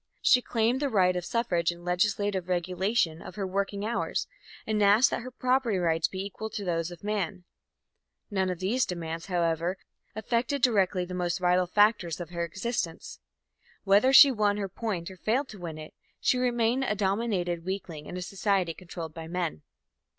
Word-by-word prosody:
She 250 - +6
claimed 235 +2 +1
the 285 -1 0
right 185 -5 +3
of 180 - -2
suffrage 180 -6 0
and 175 0 -12
legislative 190 0 0
regulation 180 -1 0
of - - -10
her 200 -2 -3
working 200 +2 -2
hours, 235 +2 -1 0.4
and 215 -1 0
asked 205 +6 +5
that - - -2
her 250 - -7
property 255 -4 +1
rights 165 -2 +1
be 190 +1 -5
equal 220 +2 -6
to 205 -2 -5
those 165 -1 -1
of 175 -2 -11
the - - -11
man. 195 -3 -2 0.9
None 190 -2 0
of 180 - -2
these 210 +8 +1
demands, 165 -2 -4
however, 170 0 0 0.4
affected 235 +5 -1
directly 195 -6 +3
the 180 - -8
most 175 -1 -1
vital 180 0 +2
factors 205 -4 +2
of 175 -1 -7
her 170 -1 -2
existence. 190 0 -4 0.6
Whether 205 +6 +5
she 275 +1 +10
won 210 -3 +1
her 200 -1 -2
point 190 -3 -4
or 190 - -12
failed 250 +9 0
to 210 - -10
win 165 -3 -6
it, 155 0 -10 0.3
she 250 - +2
remained 245 +1 +1
a 210 - 0
dominated 195 -4 -1
weakling 175 -5 -5
in 180 - -6
a 180 - -4
society 190 -2 0
controlled 165 -2 -8
by 165 -1 -8
men. 170 - -3
190 Hz, 180 wpm, -28 LUFS, 175-220 Hz, 0.9 s, she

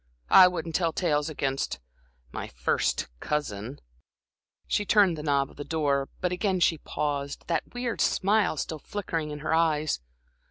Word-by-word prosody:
I 185 - +10
wouldn't 170 -2 -4
tell 165 0 +1
tales 150 -3 0
against 135 -3 -2 0.5
my - - -5
first - - 0
cousin" 130 -4 -3 0.9
She 210 - +1
turned 200 -4 +4
the 150 - -6
knob 140 -2 +1
of - - -19
the 145 - -5
door, 145 -4 0
but 180 -1 0
again 185 0 0
she 165 -2 +3
paused, 140 -1 -3
that 170 +7 -2
weird 245 -1 -2
smile 200 -4 +2
still 155 +2 -3
flickering 165 -4 -4
in 150 0 -6
her 160 - -1
eyes. 155 -2 +2
155 Hz, 155 wpm, -27 LUFS, 145-180 Hz, 0.9 s, I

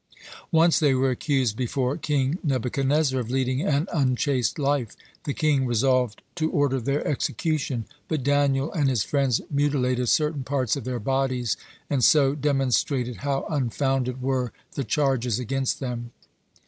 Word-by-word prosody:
Once 165 0 +4
they 145 -4 +3
were 130 0 +2
accused 130 -3 0
before 130 +2 -1
King 150 0 0
Nebuchadnezzar 135 +1 +1
of 120 -2 -4
leading 130 +1 0
an 150 -3 +1
unchaste 130 -4 +1
life. 140 -6 0 0.3
The 145 - -1
king 145 -5 +2
resolved 125 -1 +1
to 160 -1 +1
order 140 -3 +1
their 140 +5 -1
execution. 140 -3 -1 0.2
But 155 -5 -2
Daniel 140 +1 +1
and 145 -4 +2
his 120 -7 +1
friends 135 -4 +1
mutilated 130 -4 +1
certain 150 -2 +1
parts 130 -3 0
of - - -6
their 125 -1 -2
bodies, 130 -1 0 0.3
and 140 -4 0
so 140 -1 +5
demonstrated 135 -3 0
how 140 -1 -2
unfounded 130 -2 -1
were 130 -3 0 0.2
the 140 - -2
charges 135 - +1
against 130 +2 -1
them. 120 -3 -4
135 Hz, 145 wpm, -25 LUFS, 125-145 Hz, 0.3 s, so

